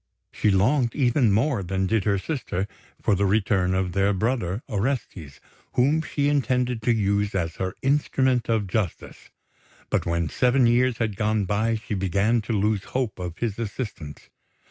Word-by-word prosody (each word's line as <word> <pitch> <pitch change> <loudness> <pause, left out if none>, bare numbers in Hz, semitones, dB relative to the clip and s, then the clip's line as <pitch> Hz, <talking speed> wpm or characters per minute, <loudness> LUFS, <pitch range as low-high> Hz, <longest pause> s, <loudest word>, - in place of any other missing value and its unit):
She - - +1
longed 115 +6 +2
even 125 -4 +3
more 115 +2 +1
than 95 +1 -1
did 110 +1 0
her 100 -2 +2
sister 100 - -3 0.4
for - - +3
the 100 +1 +2
return 95 -2 +1
of 95 -1 0
their 100 +2 +2
brother, 105 -1 -1
Orestes, 105 - -3 0.3
whom 145 +6 +3
she 145 -2 -1
intended 125 -4 +1
to 120 - +2
use 100 -2 +1
as 85 -3 -2
her 95 -1 -3
instrument 130 -3 +1
of 110 -3 +1
justice; 95 -2 -4 0.6
but - - 0
when 85 -1 0
seven 125 - +2
years 120 +1 +3
had 110 -3 -1
gone 105 0 0
by 110 +4 0
she 110 0 -5
began 100 +4 +1
to - - +1
lose 105 -1 0
hope 125 -7 -2
of 90 -1 -5
his 115 0 -3
assistance. 100 - -6
105 Hz, 165 wpm, -24 LUFS, 95-125 Hz, 0.6 s, even